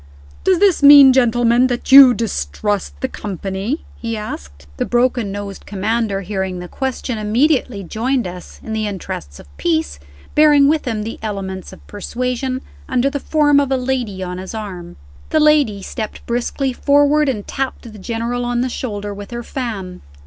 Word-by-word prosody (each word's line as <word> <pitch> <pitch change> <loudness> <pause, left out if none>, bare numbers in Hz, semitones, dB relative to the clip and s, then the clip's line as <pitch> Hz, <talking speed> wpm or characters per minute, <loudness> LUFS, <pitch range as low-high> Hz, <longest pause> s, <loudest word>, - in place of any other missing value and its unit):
"Does 375 -1 +3
this 385 -3 +3
mean, 280 -2 +9
gentlemen, 240 0 +3
that 245 0 -3
you 265 -2 +10
distrust 205 - -2
the 260 - 0
company?" 200 - -4
he 230 -1 -4
asked. 70 - -8
The - - -1
broken 240 -3 +1
nosed 200 -1 -7
Commander, 205 0 -1
hearing 190 -1 -3
the 180 0 -7
question, 260 0 -3
immediately 235 0 +1
joined 240 +7 -1
us, 180 0 -9
in 220 - -5
the 215 -1 -1
interests 75 - -6
of 70 0 -16
peace 160 - -1 0.3
bearing 295 -2 +5
with 305 0 +1
him 220 -3 -2
the 225 - -6
elements 195 -3 -5
of - - -15
persuasion, 250 +4 -3 0.3
under 255 +2 +1
the 285 - -3
form 290 -1 +3
of 280 -2 -1
a 265 - +2
lady 250 -7 -2
on 180 0 -5
his 190 +4 -7
arm. 185 -5 -7 0.3
The 315 - +2
lady 290 -10 +3
stepped 220 +1 -6
briskly 245 +3 -1
forward, 290 +2 +3
and 210 -6 -3
tapped 270 0 -3
the 210 - -11
General 235 +4 -3
on 240 0 -1
the 255 - -1
shoulder 205 -5 -4
with 200 0 -9
her 240 0 -5
fan. 210 -9 -5
230 Hz, 170 wpm, -18 LUFS, 200-265 Hz, 0.3 s, you